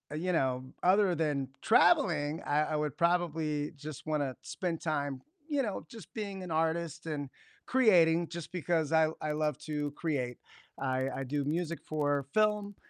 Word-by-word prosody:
you 180 +4 -1
know 130 -5 +1 0.2
other 185 0 +4
than 145 -4 0
traveling, 170 - +4
I 145 +1 +2
I - - +1
would 150 -2 -1
probably 160 -4 +1
just 145 +1 -8
wanna 145 -4 -1
spend 170 -3 -3
time, 145 -4 -2 0.3
you 285 -2 +1
know, 205 -4 -3
just 225 -2 -12
being 200 -4 -4
an 175 - -6
artist 165 +1 -1
and 145 -3 -3 0.4
creating 175 -10 +4
just 170 -1 -7
because 165 -3 0
I 160 -1 +5
I 155 - -1
love 150 -2 0
to 150 -1 -2
create. 130 -8 -2 0.4
I 130 0 0
I 135 - -4
do 145 +2 -1
music 170 +2 -1
for 145 -2 0
film, 210 -1 +2
155 Hz, 160 wpm, -31 LUFS, 145-175 Hz, 0.4 s, I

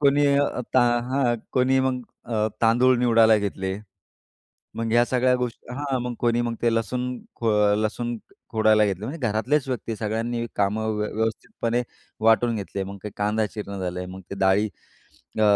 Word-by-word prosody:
कोणी 145 0 +4
अ, 140 -3 +1
ता 130 - +6 0.3
हां, 130 -2 +1 0.2
कोणी 130 +1 +3
मग 130 -1 0 0.2
अ, 110 -2 0
तांदूळ 125 +3 +5
निवडायला 115 -2 +5
घेतले. 95 -2 -2 1.0
मग 115 0 -2
ह्या 120 0 +5
सगळ्या 125 0 +2
गोष्टी 125 -1 -5
हां, 135 -1 -2
मग 125 0 -3
कोणी 120 0 +2
मग 120 -1 -2
ते 115 -1 +3
लसूण 115 +2 -1 0.3
खो 115 - -1
अ, 105 -1 +4
लसूण 120 +3 -2 0.3
खोडायला 110 -1 +4
घेतले, 100 +1 -3
म्हणजे 140 -2 -3
घरातलेच 130 +7 0
व्यक्ती 115 -3 -3
सगळ्यांनी 115 +2 -2
कामं 105 +2 0
व्य 105 - -1
व्यवस्थितपणे 115 +2 -1 0.4
वाटून 115 +1 +4
घेतले. 100 -1 -4
मग 100 +1 -8
ते 105 - -4
कांदा 105 +1 +1
चिरण 100 -2 -6
झालं 90 -1 -3
आहे, 90 - -5
मग 95 +1 -8
ते - - -3
डाळी 95 +3 +3 0.7
अ, 110 - +3
115 Hz, 170 wpm, -24 LUFS, 105-125 Hz, 1.0 s, ता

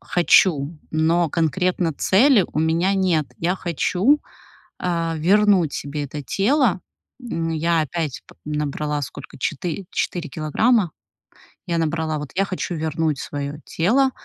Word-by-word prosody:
хочу, 165 -3 +3
но 165 +2 +2
конкретно 170 +2 0
цели 210 - +4
у - - -2
меня 165 +5 +2
нет. 180 -6 +1
Я 180 +3 0
хочу, 190 - +1 0.6
э, 165 -2 -1
вернуть 190 -1 +3
себе 145 +1 -4
это 145 +1 -6
тело. 210 - +2 0.4
М, 165 -9 -3
я 165 +1 +1
опять 155 -2 -4
п - - -17
набрала 150 0 -2
сколько 140 - -8
четы 165 +7 -3
четыре 170 -3 -2
килограмма. 175 - +1 0.8
Я 170 -2 -1
набрала, 160 -1 -1
вот, 145 -2 -7
я 195 - +2
хочу 185 -2 -4
вернуть 155 -2 -1
своё 145 0 -4
тело, 255 +11 +2
165 Hz, 130 wpm, -22 LUFS, 155-185 Hz, 0.8 s, цели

